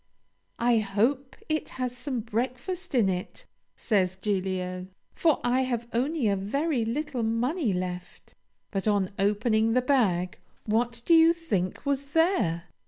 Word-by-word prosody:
'I 235 Hz, -1 st, +3 dB
hope 230 Hz, +7 st, 0 dB
it 310 Hz, -1 st, -1 dB
has 250 Hz, -1 st, -2 dB
some 250 Hz, -1 st, -3 dB
breakfast 255 Hz, -, -3 dB
in 230 Hz, -6 st, +4 dB
it,' 180 Hz, -1 st, -4 dB, 0.3 s
says 190 Hz, -4 st, +1 dB
Giglio, 185 Hz, -2 st, -2 dB, 0.3 s
'for 320 Hz, -4 st, +2 dB
I 250 Hz, +2 st, +2 dB
have 240 Hz, -3 st, -2 dB
only 265 Hz, +2 st, +1 dB
a 200 Hz, -, +2 dB
very 255 Hz, +7 st, 0 dB
little 260 Hz, +3 st, -2 dB
money 235 Hz, -, 0 dB
left.' 180 Hz, -1 st, -5 dB, 0.4 s
But 195 Hz, 0 st, -2 dB
on 200 Hz, -2 st, +2 dB
opening 220 Hz, +2 st, +2 dB
the 255 Hz, -, +3 dB
bag, 195 Hz, -10 st, +1 dB, 0.3 s
what 235 Hz, +2 st, 0 dB
do 340 Hz, -, +4 dB
you 330 Hz, 0 st, +7 dB
think 205 Hz, -, -2 dB
was 280 Hz, 0 st, -2 dB
there? 270 Hz, -, +2 dB
230 Hz, 140 wpm, -27 LUFS, 195-275 Hz, 0.4 s, you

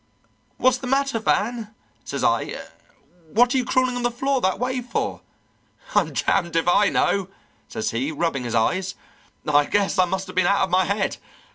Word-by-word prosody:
'What's 255 Hz, 0 st, +3 dB
the 255 Hz, -, -6 dB
matter, 275 Hz, -2 st, +1 dB
Van?' 220 Hz, 0 st, -1 dB, 0.3 s
says -, -, -4 dB
I. -, -, 0 dB, 0.7 s
'What 245 Hz, +2 st, +4 dB
are -, -, +2 dB
you -, -, 0 dB
crawling 255 Hz, +1 st, +1 dB
on 245 Hz, -, -2 dB
the 240 Hz, -, +1 dB
floor 265 Hz, +2 st, -1 dB
that 190 Hz, 0 st, +1 dB
way 255 Hz, +1 st, -2 dB
for?' 245 Hz, -1 st, -3 dB, 0.7 s
'I'm -, -, +2 dB
damned 170 Hz, -4 st, 0 dB
if 165 Hz, +1 st, +1 dB
I 200 Hz, +3 st, +4 dB
know,' 195 Hz, -2 st, +1 dB, 0.4 s
says 220 Hz, -1 st, -3 dB
he, 130 Hz, +6 st, -2 dB
rubbing 155 Hz, -4 st, -1 dB
his 120 Hz, -, -2 dB
eyes. 185 Hz, +12 st, 0 dB, 0.5 s
'I 145 Hz, 0 st, +4 dB
guess 200 Hz, -1 st, +1 dB
I 185 Hz, -, +6 dB
must 190 Hz, +2 st, -3 dB
have -, -, -10 dB
been 180 Hz, -1 st, +3 dB
out 200 Hz, +1 st, +3 dB
of 190 Hz, -, -2 dB
my 185 Hz, +1 st, +3 dB
head. 200 Hz, +1 st, -1 dB
200 Hz, 185 wpm, -23 LUFS, 180-245 Hz, 0.7 s, I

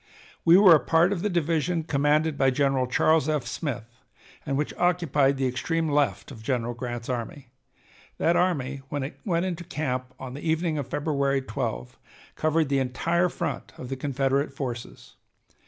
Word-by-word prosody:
We 170 Hz, +2 st, +7 dB
were 195 Hz, -3 st, +8 dB
a 155 Hz, -, +6 dB
part 170 Hz, +6 st, +3 dB
of 175 Hz, -, -3 dB
the 210 Hz, -, 0 dB
division 170 Hz, -1 st, 0 dB
commanded 150 Hz, +1 st, +1 dB
by 135 Hz, -1 st, +3 dB
General 135 Hz, -1 st, +1 dB
Charles 155 Hz, +4 st, +3 dB
F. 150 Hz, -5 st, 0 dB
Smith, 120 Hz, -2 st, -5 dB, 0.5 s
and 135 Hz, -1 st, 0 dB
which 150 Hz, -, -2 dB
occupied 155 Hz, -6 st, +2 dB
the 135 Hz, -, 0 dB
extreme 160 Hz, +6 st, -1 dB
left 140 Hz, -, 0 dB
of 115 Hz, -5 st, -10 dB
General 120 Hz, 0 st, -1 dB
Grant's 120 Hz, -1 st, -5 dB
army. 125 Hz, +2 st, -5 dB, 0.7 s
That 170 Hz, -, +2 dB
army, 140 Hz, -7 st, 0 dB
when 145 Hz, -2 st, -2 dB
it 140 Hz, -, -7 dB
went 175 Hz, -3 st, +1 dB
into 175 Hz, -2 st, -3 dB
camp 130 Hz, -5 st, -3 dB
on 130 Hz, -1 st, -7 dB
the 140 Hz, -, -7 dB
evening 160 Hz, -1 st, 0 dB
of 140 Hz, -, -4 dB
February 140 Hz, -2 st, 0 dB
12, -, -, -4 dB, 0.4 s
covered 155 Hz, -1 st, +1 dB
the 140 Hz, -1 st, +2 dB
entire 165 Hz, +8 st, +1 dB
front -, -, -4 dB
of 125 Hz, -, -8 dB
the 135 Hz, -, -2 dB
Confederate 135 Hz, +1 st, 0 dB
forces. 125 Hz, -4 st, -7 dB
140 Hz, 170 wpm, -26 LUFS, 130-160 Hz, 0.7 s, were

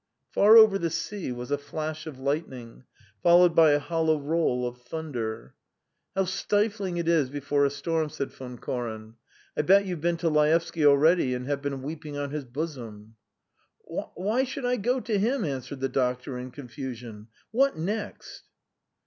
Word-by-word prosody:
Far 215 Hz, +3 st, +7 dB
over 215 Hz, -3 st, +7 dB
the 170 Hz, -, 0 dB
sea 190 Hz, -1 st, -4 dB
was 125 Hz, +2 st, -6 dB
a 145 Hz, -, +1 dB
flash 155 Hz, +2 st, -5 dB
of 150 Hz, -4 st, -7 dB
lightning, 130 Hz, -4 st, -4 dB, 0.4 s
followed 175 Hz, 0 st, +6 dB
by 160 Hz, -2 st, +7 dB
a -, -, +4 dB
hollow 160 Hz, 0 st, +1 dB
roll 145 Hz, -4 st, 0 dB
of 120 Hz, 0 st, -8 dB
thunder. 120 Hz, -, -5 dB, 0.6 s
"How 195 Hz, 0 st, +2 dB
stifling 200 Hz, 0 st, -1 dB
it 170 Hz, -1 st, -2 dB
is 160 Hz, -6 st, +3 dB
before 140 Hz, 0 st, 0 dB
a -, -, +3 dB
storm!" 160 Hz, +2 st, -1 dB
said 145 Hz, -3 st, -5 dB
Von 125 Hz, -2 st, -9 dB
Koren. 110 Hz, -3 st, -5 dB, 0.4 s
"I -, -, +2 dB
bet 195 Hz, +6 st, +5 dB
you've 180 Hz, -5 st, -4 dB
been 170 Hz, +1 st, +1 dB
to 165 Hz, -, -1 dB
Laevsky 155 Hz, +1 st, +2 dB
already 145 Hz, -1 st, +4 dB
and 125 Hz, 0 st, -5 dB
have 140 Hz, 0 st, -2 dB
been 140 Hz, -2 st, -4 dB
weeping 150 Hz, 0 st, -6 dB
on 145 Hz, -1 st, -3 dB
his 150 Hz, -2 st, -4 dB
bosom." 120 Hz, -6 st, -6 dB, 0.7 s
"Why 215 Hz, +8 st, -2 dB
should 265 Hz, 0 st, -4 dB
I 250 Hz, 0 st, +1 dB
go 245 Hz, +5 st, 0 dB
to 210 Hz, -2 st, -1 dB
him?" 235 Hz, +2 st, +1 dB
answered 135 Hz, -1 st, -5 dB
the 135 Hz, -, +1 dB
doctor 125 Hz, 0 st, -1 dB
in 125 Hz, +1 st, -6 dB
confusion. 125 Hz, -4 st, -8 dB, 0.2 s
"What 270 Hz, +1 st, +2 dB
next?" 205 Hz, +6 st, -5 dB
150 Hz, 165 wpm, -27 LUFS, 130-175 Hz, 0.7 s, Far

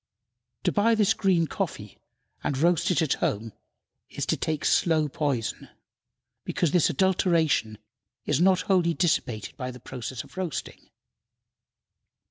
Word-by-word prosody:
To -, -, +2 dB
buy 225 Hz, +3 st, +3 dB
this 210 Hz, -1 st, +3 dB
green 185 Hz, -5 st, +2 dB
coffee 155 Hz, -, -5 dB, 0.4 s
and 140 Hz, -, -1 dB
roast 170 Hz, +3 st, +2 dB
it 175 Hz, -2 st, +2 dB
at 155 Hz, -, +1 dB
home 110 Hz, +1 st, -1 dB, 0.6 s
is -, -, -4 dB
to -, -, +1 dB
take 155 Hz, -2 st, -2 dB
slow 160 Hz, -3 st, +3 dB
poison, 140 Hz, -5 st, -2 dB, 0.7 s
because 170 Hz, -5 st, 0 dB
this 175 Hz, -1 st, +3 dB
adulteration 165 Hz, -, +1 dB, 0.5 s
is 150 Hz, +1 st, +1 dB
not 185 Hz, 0 st, +4 dB
wholly 180 Hz, -4 st, +2 dB
dissipated 120 Hz, -, -1 dB
by 125 Hz, -2 st, -4 dB
the 125 Hz, 0 st, -9 dB
process 125 Hz, 0 st, -6 dB
of -, -, -18 dB
roasting. 180 Hz, -5 st, -5 dB
160 Hz, 130 wpm, -26 LUFS, 130-185 Hz, 0.7 s, not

